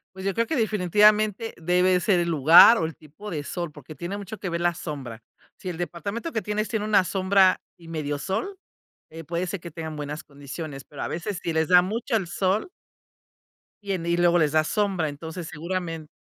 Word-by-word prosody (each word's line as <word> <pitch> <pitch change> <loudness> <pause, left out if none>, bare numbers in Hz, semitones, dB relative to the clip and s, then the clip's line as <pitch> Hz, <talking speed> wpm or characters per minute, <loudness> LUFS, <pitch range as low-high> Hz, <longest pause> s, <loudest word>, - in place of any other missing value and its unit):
Pues, 190 0 -8
yo 195 - -1
creo 230 - +2
que 315 - -2
definitivamente 210 0 +3
debe 180 +2 +2
ser 180 0 +2
el 170 0 0
lugar 165 - +8
o 160 - 0
el 160 - -5
tipo 160 +7 -11
de 150 -3 -3
sol, 170 0 -4
porque 150 +1 -12
tiene 175 +7 -5
mucho 205 +1 -7
que 195 - -6
ver 170 0 -2
la 175 -1 +1
sombra. 130 -9 -7 0.3
Si 185 - -6
el 165 - -5
departamento 200 - -4
que 220 - -2
tienes 210 +1 -1
tiene 215 -2 -2
una 205 -3 +4
sombra 190 0 +3 0.2
y 165 -1 -15
medio 145 -3 -3
sol, 355 - -3 0.5
eh 165 +1 -9
puede 170 +4 -3
ser 195 0 -4
que 170 -1 -9
tengan 160 -1 -6
buenas 150 +1 -5
condiciones, 140 0 -8
pero 145 - -10
a - - -2
veces, 175 +3 -4
si 170 - -2
les 160 0 +1
da 180 -1 +7
mucho 225 +6 -2
el 190 -6 0
sol 195 - 0 1.1
y 200 - -4
en 175 -3 -2
y 170 0 +1
luego 175 0 +3
les 155 -1 +2
da 155 0 +4
sombra, 190 -4 0
entonces 160 +4 -7
seguramente. 165 -1 -4
175 Hz, 210 wpm, -25 LUFS, 160-200 Hz, 1.1 s, lugar